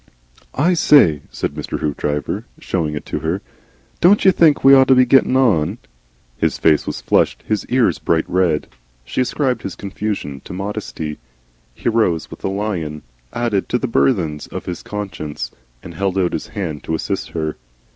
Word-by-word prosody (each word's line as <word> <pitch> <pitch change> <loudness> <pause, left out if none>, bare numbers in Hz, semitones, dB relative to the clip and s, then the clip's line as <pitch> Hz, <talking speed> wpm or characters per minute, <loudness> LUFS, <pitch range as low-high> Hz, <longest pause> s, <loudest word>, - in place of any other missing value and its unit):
"I 170 +7 +3
say," 120 - +5
said - - -3
Mr. - - -4
Hoopdriver, 75 0 -2
showing 80 -5 -2
it 75 - -6
to - - -3
her, 85 +5 -2 0.6
"don't 195 +4 +5
you 190 - +8
think 160 -5 +4
we 135 +1 +8
ought 135 -1 +7
to 130 - +6
be 130 0 +6
getting 130 0 +4
on?" 100 -7 +2 0.6
His - - +1
face 75 -2 +3
was - - -4
flushed, - - +1
his 110 -1 -1
ears 125 -2 +2
bright 80 -1 +1
red. 90 -5 +1 0.4
She - - -1
ascribed 130 0 0
his 95 - -5
confusion 95 -8 -4
to - - -8
modesty. 95 -6 -5 0.6
He - - -5
rose 110 -9 +1
with - - -11
a - - 0
lion 95 -7 -3 0.3
added 115 -5 -1
to 125 - +2
the 130 - -2
burthens 90 - +1
of - - -7
his 90 - -5
conscience, 100 -8 -5 0.3
and 85 - -9
held 95 +2 -1
out 90 -2 +1
his - - -3
hand 80 -7 -5
to 80 - -1
assist 95 +4 -3
her. 80 -2 -2
95 Hz, 175 wpm, -19 LUFS, 80-120 Hz, 0.6 s, you